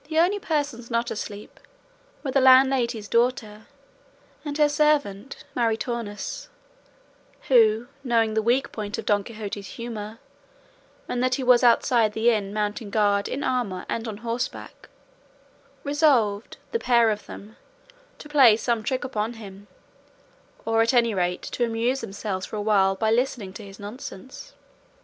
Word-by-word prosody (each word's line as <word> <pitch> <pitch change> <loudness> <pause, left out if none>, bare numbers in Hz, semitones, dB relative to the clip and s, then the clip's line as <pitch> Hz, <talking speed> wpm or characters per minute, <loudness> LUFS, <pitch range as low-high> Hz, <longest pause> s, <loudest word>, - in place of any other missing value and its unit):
The 315 - -2
only 365 +5 +3
persons 290 -9 -3
not 235 0 -1
asleep 205 -1 -7 0.6
were 270 - -2
the 275 - +3
landlady's 255 -4 +4
daughter 230 -3 0 0.8
and 290 -1 -4
her 300 -1 +5
servant 290 -7 0
Maritornes, 230 - -3 1.0
who, 225 -3 +4 0.2
knowing 230 -4 +1
the 220 - +1
weak 250 +5 +1
point 210 -2 -5
of - - -6
Don 205 -1 +2
Quixote's 205 -2 -7
humour, 225 -2 -7 0.9
and 245 - -2
that 255 0 +2
he 265 - -4
was 250 0 +5
outside 235 -2 +3
the 225 +2 +3
inn 205 -3 -1
mounting 210 0 -3
guard 205 -1 +1
in 280 - -4
armour 235 -8 -2
and 230 0 -3
on 215 -2 -5
horseback, 235 +1 -5 0.9
resolved, 270 -9 +1
the 460 - 0
pair 235 - +3
of 210 0 -5
them, 210 +3 -11 0.6
to - - -11
play 265 -7 +6
some 230 -1 -1
trick 255 +4 -2
upon 225 -2 -3
him, 205 -3 -12 1.0
or 225 0 +2
at 230 +3 +2
any 235 -2 +3
rate 180 -2 -1
to 245 - -3
amuse 235 +3 0
themselves 195 -1 -5
for - - -7
a - - -3
while 195 -2 +3
by 220 +2 0
listening 230 -5 -1
to 215 - -9
his 195 -1 -12
nonsense. 210 +2 -9
230 Hz, 150 wpm, -24 LUFS, 210-255 Hz, 1.0 s, play